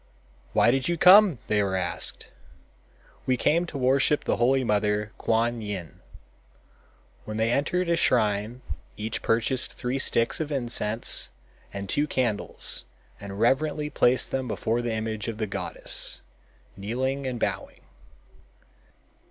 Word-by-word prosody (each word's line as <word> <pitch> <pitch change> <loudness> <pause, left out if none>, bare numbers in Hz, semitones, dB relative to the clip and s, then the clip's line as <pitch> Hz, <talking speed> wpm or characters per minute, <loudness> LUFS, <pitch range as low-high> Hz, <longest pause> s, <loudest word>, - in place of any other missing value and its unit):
"Why 120 - +4
did 135 0 0
you 175 - 0
come!" 185 - +7
they 105 -1 +1
were 95 -1 -1
asked. 90 -2 -3 1.0
"We 130 -1 +2
came 170 +7 +2
to 155 - -6
worship 135 +3 +2
the - - 0
holy 130 +3 +2
mother, 105 -1 0
Kuan 115 +1 0
Yin." 100 -7 -6 1.3
When 110 0 -5
they 110 +1 +1
entered 170 +7 0
a 170 - +2
shrine 110 -4 +1 0.3
each 110 +2 -4
purchased 120 +3 0
three 125 +2 -3
sticks, 115 -3 +1
of 155 -1 -3
incense 120 - 0 0.4
and 100 0 -6
two 145 +10 +1
candles 120 -7 -1 0.4
and 100 0 -8
reverently 150 +5 +1
placed 125 +1 +3
them 130 -1 -2
before 115 +1 -1
the 120 -1 -2
image 110 -1 -3
of 115 -2 -4
the 110 - -1
goddess, 100 - -1 0.5
kneeling 130 +7 -2
and 125 -2 -4
bowing. - - -3
120 Hz, 135 wpm, -26 LUFS, 105-135 Hz, 1.3 s, come